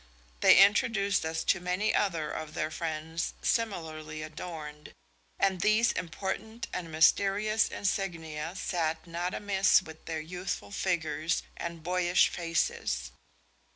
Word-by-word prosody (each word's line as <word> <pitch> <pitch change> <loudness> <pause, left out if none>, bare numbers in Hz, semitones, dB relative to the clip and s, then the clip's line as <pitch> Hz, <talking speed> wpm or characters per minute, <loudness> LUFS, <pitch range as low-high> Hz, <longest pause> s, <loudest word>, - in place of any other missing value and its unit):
They - - +7
introduced 200 -1 +4
us 160 0 -2
to - - +2
many 180 +4 0
other 165 -7 0
of 155 -1 -6
their 155 +1 -1
friends 160 +1 -3
similarly 155 -9 -2
adorned, 155 -1 -8 0.4
and 190 -2 +1
these 215 +3 +4
important 200 +6 -4
and 170 -3 -4
mysterious 200 +7 +3
insignia 165 -5 -3
sat 165 -5 -2
not 175 +2 -3
amiss 195 -2 +3
with 160 -2 -12
their 160 -1 -3
youthful 180 +5 -5
figures 170 -4 -1
and 170 -2 -6
boyish 180 0 +3
faces. 65 - -1
175 Hz, 120 wpm, -30 LUFS, 160-195 Hz, 0.4 s, They